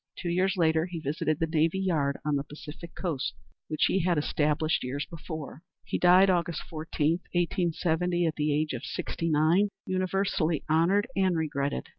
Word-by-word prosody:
Two 175 Hz, -, -3 dB
years 185 Hz, +2 st, +1 dB
later 160 Hz, -1 st, +2 dB
he 175 Hz, -2 st, -6 dB
visited 155 Hz, +1 st, -1 dB
the 165 Hz, -, +2 dB
navy 160 Hz, +2 st, +1 dB
yard 155 Hz, -7 st, 0 dB
on 150 Hz, -1 st, +1 dB
the 140 Hz, -, 0 dB
Pacific 155 Hz, +3 st, -10 dB
Coast, 160 Hz, -8 st, -2 dB, 0.3 s
which 155 Hz, -, +1 dB
he 195 Hz, -, +2 dB
had 175 Hz, -2 st, +1 dB
established 150 Hz, +1 st, +1 dB
years 135 Hz, +3 st, -3 dB
before. 160 Hz, -3 st, -8 dB, 0.2 s
He -, -, -3 dB
died 180 Hz, +2 st, +6 dB
Aug. 175 Hz, -3 st, +1 dB
14, 160 Hz, +1 st, -1 dB, 0.2 s
1870, 175 Hz, 0 st, +1 dB
at 160 Hz, -2 st, 0 dB
the 150 Hz, 0 st, 0 dB
age 150 Hz, 0 st, 0 dB
of 120 Hz, -, -5 dB
sixty 165 Hz, -, -3 dB
nine, 160 Hz, +7 st, +3 dB, 0.2 s
universally 185 Hz, -4 st, 0 dB
honored 170 Hz, +6 st, +3 dB
and 185 Hz, -3 st, +2 dB
regretted. 145 Hz, -3 st, -2 dB
160 Hz, 165 wpm, -28 LUFS, 150-180 Hz, 0.3 s, died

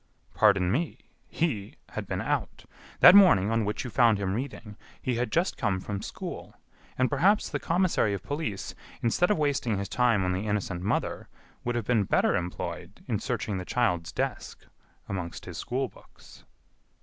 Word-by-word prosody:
"Pardon 100 Hz, -4 st, +4 dB
me! 160 Hz, +9 st, -1 dB, 0.3 s
He 115 Hz, -12 st, -2 dB
had -, -, -6 dB
been -, -, -2 dB
out. -, -, -2 dB, 0.4 s
That -, -, +11 dB
morning, 115 Hz, -, +6 dB
on 115 Hz, -1 st, +1 dB
which 105 Hz, -, -2 dB
you 125 Hz, -, -6 dB
found 115 Hz, -1 st, +4 dB
him 95 Hz, -1 st, -2 dB
reading, 110 Hz, -3 st, -5 dB, 0.2 s
he 125 Hz, -2 st, -2 dB
had 125 Hz, +1 st, -1 dB
just 175 Hz, +3 st, +1 dB
come 100 Hz, -5 st, 0 dB
from 100 Hz, +1 st, -5 dB
school, -, -, -7 dB, 0.4 s
and 130 Hz, -, +3 dB
perhaps 185 Hz, +10 st, +2 dB
the -, -, -2 dB
commissary 165 Hz, -, +1 dB
of 100 Hz, -, -7 dB
police, 145 Hz, -9 st, -4 dB, 0.3 s
instead 120 Hz, +10 st, +2 dB
of 210 Hz, -, +2 dB
wasting 140 Hz, -8 st, 0 dB
his 100 Hz, 0 st, -3 dB
time 120 Hz, -6 st, +2 dB
on 90 Hz, -, +1 dB
the 95 Hz, +4 st, -2 dB
innocent 100 Hz, -4 st, -2 dB
mother, 100 Hz, -, -2 dB, 0.3 s
would 120 Hz, 0 st, -2 dB
have 120 Hz, -3 st, -2 dB
been 110 Hz, -4 st, +2 dB
better -, -, +2 dB
employed 90 Hz, 0 st, -5 dB
in -, -, -1 dB
searching 100 Hz, -3 st, -2 dB
the -, -, -4 dB
child's 90 Hz, -7 st, 0 dB
desk -, -, -4 dB, 0.4 s
amongst 90 Hz, -3 st, -5 dB
his -, -, -7 dB
school 130 Hz, +2 st, -2 dB
books." -, -, -18 dB
110 Hz, 175 wpm, -28 LUFS, 100-135 Hz, 0.4 s, That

